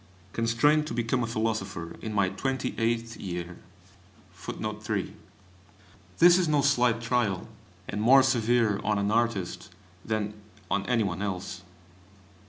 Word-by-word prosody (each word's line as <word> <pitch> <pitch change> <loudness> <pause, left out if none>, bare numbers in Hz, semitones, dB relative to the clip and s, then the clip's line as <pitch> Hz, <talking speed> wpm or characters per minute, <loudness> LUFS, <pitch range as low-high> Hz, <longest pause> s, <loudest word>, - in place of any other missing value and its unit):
Constrained 130 +7 +2
to 115 - -4
become 120 +1 0
a - - -2
philosopher 105 -6 -3
in 110 - -4
my 100 -3 +2
twenty 130 +7 -2
eighth 115 0 -1
year! 90 -2 -5 2.6
This 175 +1 +7
is 180 - +1
no 150 -2 +3
slight 125 -5 +3
trial, 115 -6 0 0.4
and 105 - -3
more 130 +4 +7
severe 120 -5 +2
on 105 0 +1
an 100 +1 0
artist 110 -4 -1 0.3
than 110 -1 -2 0.4
on 100 0 0
any 120 -3 +2
one 95 -2 -3
else. 95 -2 -4
115 Hz, 125 wpm, -28 LUFS, 100-125 Hz, 2.6 s, This